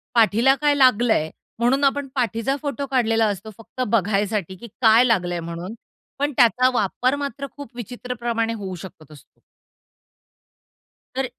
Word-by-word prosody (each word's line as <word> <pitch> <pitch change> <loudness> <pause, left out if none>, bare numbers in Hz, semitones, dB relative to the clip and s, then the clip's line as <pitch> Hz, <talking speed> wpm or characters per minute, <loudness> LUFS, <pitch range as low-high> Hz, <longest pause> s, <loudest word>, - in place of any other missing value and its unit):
पाठीला 230 +4 +4
काय 290 -1 +3
लागलं 245 -4 +4
आहे, 155 +1 -1 0.3
म्हणून 255 +4 +2
आपण 280 0 +1
पाठीचा 245 +1 0
फोटो 285 -1 -3
काढलेला 225 -3 +2
असतो, 205 +1 -4
फक्त 230 +3 -8
बघायसाठी, 205 -3 0
की 235 +6 -11
काय 225 +1 +6
लागलं 185 -8 +1
आहे 175 - -2
म्हणून. 170 +5 -6 0.5
पण 290 +1 0
त्याचा 250 +1 +4
वापर 250 +5 0
मात्र 280 -1 -5
खूप 280 -4 -10
विचित्रप्रमाणे 240 -1 -3
होऊ 195 -4 -6
शकत 165 -4 -12
असतो. 145 - -18 1.8
तर 265 0 0
230 Hz, 140 wpm, -22 LUFS, 205-255 Hz, 1.8 s, काय